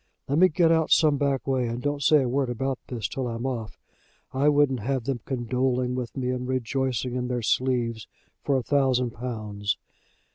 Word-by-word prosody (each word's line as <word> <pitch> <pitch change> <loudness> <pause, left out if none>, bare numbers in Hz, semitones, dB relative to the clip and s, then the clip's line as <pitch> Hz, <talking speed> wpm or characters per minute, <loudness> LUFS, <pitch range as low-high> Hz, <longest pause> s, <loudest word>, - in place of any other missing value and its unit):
"Let 140 +3 +1
me 185 +1 +7
get 165 0 +3
out 160 -1 +2
some 150 -3 +5
back 140 -2 0
way, 130 -3 0
and 115 +1 -3
don't 145 +2 -2
say 150 0 +5
a - - -1
word 130 +1 0
about 130 +2 -2
this 115 -7 -3
till 130 -2 -3
I'm 115 +1 -4
off. 120 -5 -4 0.6
I 140 +3 +3
wouldn't 145 -3 +3
have 130 +3 -1
them 130 0 -2
condoling 125 0 0
with 125 0 -4
me, 125 -1 -1
and 125 0 -3
rejoicing 130 -1 -1
in 125 0 -2
their 125 -1 -2
sleeves, 115 -1 0 0.4
for 140 -2 +2
a 130 - -2
thousand 130 -3 +2
pounds. 105 -4 -3
130 Hz, 190 wpm, -26 LUFS, 120-135 Hz, 0.6 s, me